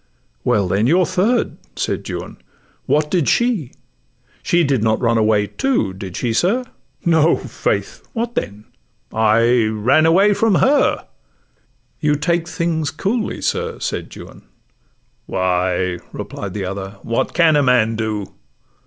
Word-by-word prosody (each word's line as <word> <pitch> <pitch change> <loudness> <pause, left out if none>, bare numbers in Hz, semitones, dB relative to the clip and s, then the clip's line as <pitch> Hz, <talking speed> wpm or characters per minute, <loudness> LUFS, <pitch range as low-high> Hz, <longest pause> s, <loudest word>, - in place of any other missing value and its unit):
'Well, 100 -3 +2
then, 100 +5 +1
your 175 +5 +4
third,' 195 +7 0 0.2
said - - -3
Juan; - - -6 0.5
'what 150 0 +1
did 175 -7 +2
she? 235 - +1 0.7
She 175 0 +2
did 135 -6 +1
not 110 0 +1
run 115 -2 +2
away, 105 -1 +3
too,—did 100 - -2
she, 120 -3 -1
sir?' 205 - +1 0.4
'No, 165 -1 +4
faith.'—'What 235 0 -3
then?'—'I 115 - 0
ran 115 +9 +3
away 195 +5 +5
from 220 -1 +2
her.' 280 +9 +2 0.9
'You 150 -2 +2
take 170 +3 0
things 165 -4 -1
coolly, 205 +9 -2
sir,' - - -2
said - - -4
Juan. - - -12 0.9
'Why,' 90 -1 0
Replied 100 -1 -6
the 100 -2 -3
other, 95 +1 -6
'what 115 - -1
can 165 -3 +4
a 145 - +4
man 125 -4 +3
do? 110 -3 -3
125 Hz, 125 wpm, -19 LUFS, 105-175 Hz, 0.9 s, away